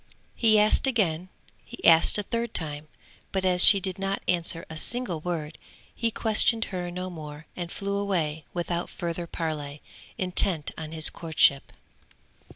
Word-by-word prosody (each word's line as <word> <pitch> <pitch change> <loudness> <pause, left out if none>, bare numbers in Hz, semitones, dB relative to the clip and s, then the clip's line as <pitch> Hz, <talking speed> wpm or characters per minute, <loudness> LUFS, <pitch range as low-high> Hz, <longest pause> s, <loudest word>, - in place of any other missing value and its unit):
He 220 -2 +3
asked 210 +5 +2
again, 185 -8 0 0.3
he - - -10
asked 165 +3 +5
a 205 - -1
third 230 +2 -4
time, 150 -2 -2 0.4
but 190 -1 -2
as 180 -1 +5
she 200 - +10
did 190 0 -4
not 195 0 -3
answer 170 -1 0
a 160 - -9
single 230 0 -3
word, 160 -2 -5 0.3
he 230 - -1
questioned 225 +1 +2
her 180 -1 -4
no 180 +1 -6
more 150 -2 -10
and 175 -1 -6
flew 200 0 -3
away 165 -7 -2
without 175 0 -3
further 170 -1 -5
parley, 150 -4 -5 0.3
intent 180 -4 0
on 155 -1 -8
his 160 -1 +4
courtship. 155 -4 +1
175 Hz, 155 wpm, -26 LUFS, 160-195 Hz, 0.4 s, she